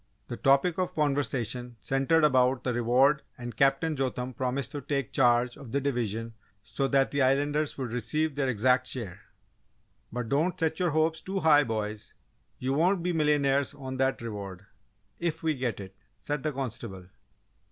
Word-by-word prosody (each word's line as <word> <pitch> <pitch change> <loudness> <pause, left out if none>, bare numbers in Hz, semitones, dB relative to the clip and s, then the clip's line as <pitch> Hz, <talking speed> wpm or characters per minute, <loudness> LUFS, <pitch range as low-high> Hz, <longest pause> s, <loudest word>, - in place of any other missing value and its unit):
The - - -3
topic 140 +6 +3
of 185 - -1
conversation 125 -5 -1
centred 135 +7 +2
about 130 -3 +3
the 125 - 0
reward 125 +5 +3 0.2
and 120 -2 -7
Captain 140 +5 +2
Jotham 130 -2 -2
promised 130 +1 -2
to 145 - -5
take 140 -2 -2
charge 120 -1 +3
of 130 -5 -11
the 140 - +2
division 115 -5 -2 0.3
so 115 +5 -2
that 135 0 +2
the 140 - 0
Islanders 145 +3 +1
would 130 -4 -4
receive 150 +7 -1
their 135 -1 0
exact 125 +2 +2
share. 110 -9 -5 0.9
"But 120 0 -3
don't 155 +7 +1
set 160 0 0
your 180 -1 +2
hopes 160 +1 +1
too 195 0 -3
high, 150 -2 +6
boys 110 -2 -4 0.4
you 130 +1 -1
won't 175 +5 +2
be 180 0 0
millionaires 145 -3 +2
on 130 -2 -6
that 130 -2 0
reward 100 -4 -6 0.5
if 165 -1 -2
we 160 -1 +2
get 125 -5 -3
it!" 95 -1 -9 0.2
said 145 +6 -3
the 155 - -1
constable. 115 -8 -5
135 Hz, 165 wpm, -28 LUFS, 120-150 Hz, 0.9 s, high